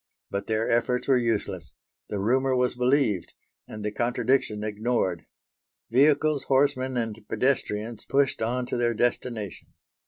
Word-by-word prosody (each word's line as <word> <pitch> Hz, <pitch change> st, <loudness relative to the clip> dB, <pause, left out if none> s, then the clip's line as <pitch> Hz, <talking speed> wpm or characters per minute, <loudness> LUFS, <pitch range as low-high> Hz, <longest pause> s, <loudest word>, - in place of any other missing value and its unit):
But 100 Hz, 0 st, -3 dB
their 110 Hz, +1 st, 0 dB
efforts 120 Hz, +1 st, +1 dB
were 135 Hz, -, +5 dB
useless. 100 Hz, -8 st, -2 dB, 0.3 s
The 105 Hz, -, -3 dB
rumour 130 Hz, +6 st, +2 dB
was 125 Hz, 0 st, +2 dB
believed 125 Hz, -, +1 dB, 0.3 s
and 105 Hz, -1 st, -7 dB
the 105 Hz, -, -1 dB
contradiction 120 Hz, 0 st, 0 dB
ignored; 105 Hz, -4 st, -1 dB, 0.6 s
vehicles, 145 Hz, +2 st, +3 dB
horsemen 130 Hz, -1 st, +2 dB
and 115 Hz, -2 st, -2 dB
pedestrians 115 Hz, -4 st, -1 dB
pushed 140 Hz, 0 st, +1 dB
on 125 Hz, +3 st, 0 dB
to 125 Hz, -, -3 dB
their 120 Hz, -1 st, +1 dB
destination. 120 Hz, -3 st, -2 dB
120 Hz, 130 wpm, -26 LUFS, 110-130 Hz, 0.6 s, were